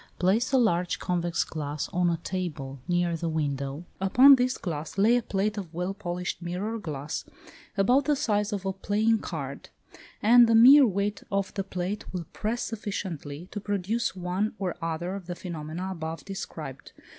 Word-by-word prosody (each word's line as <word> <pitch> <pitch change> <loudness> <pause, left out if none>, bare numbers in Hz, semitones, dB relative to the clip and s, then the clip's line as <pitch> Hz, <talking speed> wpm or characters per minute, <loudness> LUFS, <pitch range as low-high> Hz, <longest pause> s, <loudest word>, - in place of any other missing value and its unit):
Place 210 +8 +2
a 270 - +4
large 180 -8 +2
convex 175 -2 0
glass 150 -2 -4
on 180 0 +1
a 170 - 0
table 145 -8 -4
near 175 -1 +1
the 165 0 -2
window; 145 0 -2
upon 250 +9 +7
this 255 0 +2
glass 160 -1 -5
lay 220 +5 +5
a 245 - +2
plate 210 0 -1
of 180 -5 -7
well 180 +3 -2
polished 180 -3 -4
mirror 190 +6 -3
glass, 150 -5 -4 0.5
about 250 +8 +4
the 295 - +3
size 210 -5 0
of 200 -2 -3
a 190 - 0
playing 215 +3 +1
card, 140 -8 -6 0.5
and 235 +2 +7
the 230 - +4
mere 260 +4 +9
weight 200 +1 -1
of 195 -1 -1
the 195 - -2
plate 185 +2 -4
will 180 -3 -4
press 225 +3 -2
sufficiently 185 -8 -5
to 210 - -4
produce 205 +3 -1
one 185 +4 -2
or 185 -3 -2
other 165 +2 -2
of 195 -3 -7
the 175 - -4
phenomena 170 +1 -5
above 160 -3 -5
described. 195 0 -7
185 Hz, 170 wpm, -27 LUFS, 170-210 Hz, 0.5 s, mere